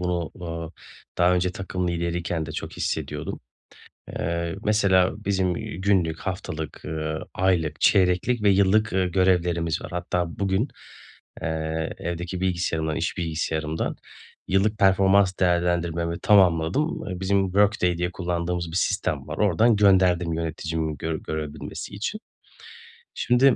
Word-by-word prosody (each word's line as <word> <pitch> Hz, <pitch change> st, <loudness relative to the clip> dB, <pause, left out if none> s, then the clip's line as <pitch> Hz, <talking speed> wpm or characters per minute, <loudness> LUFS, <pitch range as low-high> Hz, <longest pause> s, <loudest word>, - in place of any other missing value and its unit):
bunu, 90 Hz, -2 st, -1 dB
uuu, 85 Hz, -1 st, -6 dB, 0.5 s
daha 90 Hz, +1 st, +5 dB
önce 90 Hz, 0 st, +1 dB
takım 90 Hz, -1 st, -3 dB
lideriyken 85 Hz, -1 st, -2 dB
de -, -, -6 dB
çok -, -, -5 dB
hissediyordum. -, -, -3 dB, 0.8 s
Eee, 85 Hz, +2 st, -2 dB
mesela, 100 Hz, -3 st, +3 dB
bizim, 95 Hz, -3 st, +1 dB
iii, 85 Hz, -, -6 dB
günlük, 90 Hz, -5 st, +2 dB
haftalık, 80 Hz, -5 st, -5 dB
ııı, 80 Hz, 0 st, -3 dB
aylık, 85 Hz, -5 st, +1 dB
çeyreklik 95 Hz, +5 st, +3 dB
ve 105 Hz, -, +5 dB
yıllık, 100 Hz, +3 st, +3 dB
ııı, 95 Hz, 0 st, +2 dB
görevlerimiz 90 Hz, -2 st, +1 dB
var. -, -, -7 dB
Hatta 90 Hz, 0 st, -1 dB
bugün, 100 Hz, +6 st, +1 dB, 0.7 s
eee, 80 Hz, 0 st, -2 dB
evdeki 85 Hz, +2 st, -4 dB
bilgisayarımdan, 85 Hz, -4 st, -1 dB
iş 80 Hz, -, -2 dB
bilgisayarımdan 80 Hz, -1 st, -2 dB, 0.5 s
yıllık 100 Hz, +3 st, +2 dB
performans 95 Hz, -1 st, +4 dB
değerlendirmemi 85 Hz, -1 st, +1 dB
tamamladım. 95 Hz, -, +3 dB
Eee, 90 Hz, 0 st, -5 dB
bizim 95 Hz, +1 st, +2 dB
Workday 95 Hz, -2 st, +2 dB
diye 90 Hz, 0 st, 0 dB
kullandığımız 85 Hz, -1 st, -2 dB
bir 85 Hz, -, -4 dB
sistem -, -, -1 dB
var. -, -, -5 dB
Oradan 105 Hz, +3 st, +4 dB
gönderdim 95 Hz, -4 st, +4 dB
yöneticimin 80 Hz, -1 st, -3 dB
gör 80 Hz, +3 st, -2 dB
görebilmesi 80 Hz, +4 st, -6 dB
için. 110 Hz, -, -4 dB, 1.0 s
Şimdi, 125 Hz, +2 st, +4 dB
90 Hz, 125 wpm, -25 LUFS, 85-95 Hz, 1.0 s, daha